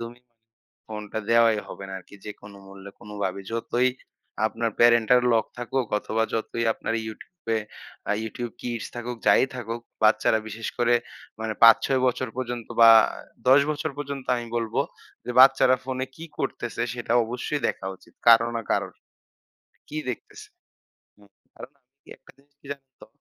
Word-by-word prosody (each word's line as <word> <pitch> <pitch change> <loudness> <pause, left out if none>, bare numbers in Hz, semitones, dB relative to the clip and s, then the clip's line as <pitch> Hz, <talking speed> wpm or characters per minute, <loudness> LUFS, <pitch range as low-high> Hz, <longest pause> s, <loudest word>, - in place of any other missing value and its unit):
তুমি 120 +1 -8 0.7
ফোনটা 105 0 -5
দেওয়াই 115 -2 +5
হবে 100 - -8
না 95 - -8
আরকি 95 - -16
যেকোনো 105 -1 -10
মূল্যে 100 0 -11
কোন 105 - -13 0.2
ভাবে। 95 +1 -2
যতই 120 +2 +1 0.6
আপনার 115 0 -2
parental 120 +1 +5
lock 110 -2 +2
থাকুক 125 0 -2
অথবা 110 +1 -1
যতই 115 +1 -2
আপনার 115 - -3
YouTube 160 - -13
এ - - +1 0.5
আ - - +4
YouTube 115 +1 -5
Kids 120 -3 -4
থাকুক, 120 0 -5
যাই - - +6
থাকুক 115 0 -5 0.2
বাচ্চারা 110 +1 +4
বিশেষ 110 +1 -5
করে 120 0 +3 0.5
মানে 110 0 -2
৫-৬ 120 +3 +6
বছর 125 0 0
পর্যন্ত 120 -2 -4 0.2
বা 115 - +10 0.6
১০ 135 +2 +8
বছর 155 +1 -2
পর্যন্ত 140 -2 -5
আমি 120 0 -5
বলব 115 -2 -3 0.5
যে 125 - -3
বাচ্চারা 130 -1 +6
ফোনে 130 0 -3
কি 165 - -8
করতেছে? 120 -3 -3
সেটা 120 -1 -3
অবশ্যই 125 +5 -3
দেখা - - -4
উচিত - - -23
কারো 115 0 +7
না 115 - -3
কারোর। - - 0 0.9
কি 155 - -7
দেখতেছে? 120 - -9 0.7
হ্যাঁ 100 -1 -22 0.2
তার - - -9
মানে 135 -3 -40
কি - - -24
একটা - - -19
জিনিস 140 +1 -28
কি - - -16
জানেন 135 -1 -16
তো? - - -11
115 Hz, 160 wpm, -25 LUFS, 110-130 Hz, 0.9 s, বা